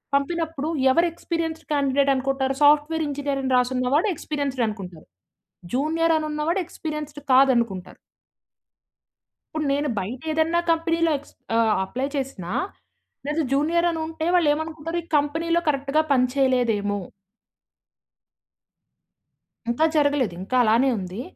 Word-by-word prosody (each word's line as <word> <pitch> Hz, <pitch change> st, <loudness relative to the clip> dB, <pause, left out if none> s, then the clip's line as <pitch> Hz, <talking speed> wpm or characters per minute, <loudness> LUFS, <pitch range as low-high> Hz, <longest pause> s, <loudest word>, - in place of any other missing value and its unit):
పంపినప్పుడు 320 Hz, +1 st, -1 dB, 0.2 s
ఎవరు 335 Hz, +6 st, +3 dB
experienced 330 Hz, -1 st, -4 dB
candidate 280 Hz, -1 st, +2 dB
అనుకుంటారు? 265 Hz, 0 st, 0 dB
సాఫ్ట్‌వేర్ 300 Hz, +2 st, +4 dB
ఇంజినీర్ 280 Hz, -1 st, -2 dB
అని 260 Hz, -, -1 dB
రాసున్నవాడె 255 Hz, -, +1 dB
ఎక్స్పీరియన్స్డ్ 285 Hz, -5 st, -2 dB
అనుకుంటారు. 185 Hz, -6 st, -8 dB, 0.7 s
జూనియర్ 325 Hz, +4 st, +2 dB
అని 310 Hz, -, -2 dB
ఉన్నవాడు 305 Hz, +5 st, 0 dB
ఎక్స్పీరియన్స్డ్ 300 Hz, -3 st, -6 dB
కాదనుకుంటారు. 235 Hz, -8 st, +2 dB, 1.6 s
ఇప్పుడు 305 Hz, -2 st, -1 dB
నేను 290 Hz, +1 st, -1 dB
బయట 230 Hz, +7 st, -5 dB
ఏదన్నా 320 Hz, +2 st, +2 dB
కంపెనీ‌లో 330 Hz, 0 st, +2 dB
ఎక్స్ 290 Hz, -, -15 dB, 0.2 s
ఆహ్, 225 Hz, -2 st, +3 dB
అప్లై 255 Hz, +8 st, -3 dB
చేసినా 265 Hz, -11 st, -4 dB, 0.8 s
లేదా 300 Hz, +2 st, 0 dB
జూనియర్ 330 Hz, +5 st, +2 dB
అని 330 Hz, -1 st, -3 dB
ఉంటే 320 Hz, 0 st, -4 dB
వాళ్ళు 330 Hz, -4 st, +4 dB
ఏమనుకుంటారు. 315 Hz, +2 st, -4 dB
ఈ -, -, -19 dB
కంపెనీ‌‌లో 325 Hz, +4 st, 0 dB
కరెక్ట్‌గా 280 Hz, +1 st, +2 dB
పని 255 Hz, -2 st, +4 dB
చేయలేదేమో! 240 Hz, -7 st, +1 dB, 2.7 s
ఇంకా 240 Hz, +7 st, +2 dB
జరగలేదు. 285 Hz, -8 st, +2 dB
ఇంకా 230 Hz, +7 st, -3 dB
అలానే 235 Hz, +4 st, +3 dB
ఉంది. 185 Hz, +4 st, -6 dB
285 Hz, 115 wpm, -24 LUFS, 255-320 Hz, 2.7 s, సాఫ్ట్‌వేర్